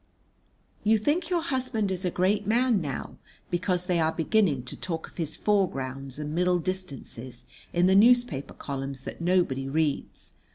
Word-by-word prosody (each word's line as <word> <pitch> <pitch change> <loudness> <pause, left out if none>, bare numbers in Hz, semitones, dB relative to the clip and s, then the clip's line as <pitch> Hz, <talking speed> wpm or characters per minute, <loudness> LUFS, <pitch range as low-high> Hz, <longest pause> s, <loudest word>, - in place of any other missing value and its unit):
You 220 +1 +4
think 305 - 0
your 345 -3 +1
husband 255 - -1
is 185 0 -2
a - - +2
great 195 +4 +1
man 235 -2 +3
now 140 -5 -5 0.3
because 180 0 0
they 180 -2 +1
are 160 0 +2
beginning 165 - +2
to 130 - -5
talk 165 -3 -4
of - - -19
his 160 -3 -2
foregrounds 135 -10 -1
and 150 0 -4
middle 180 +1 +2
distances 140 -9 -5 0.3
in 175 +1 +3
the 190 - +5
newspaper 235 - +4
columns 135 -1 -5
that - - -7
nobody 170 -7 +1
reads. 150 -1 -1
180 Hz, 160 wpm, -27 LUFS, 140-210 Hz, 0.3 s, the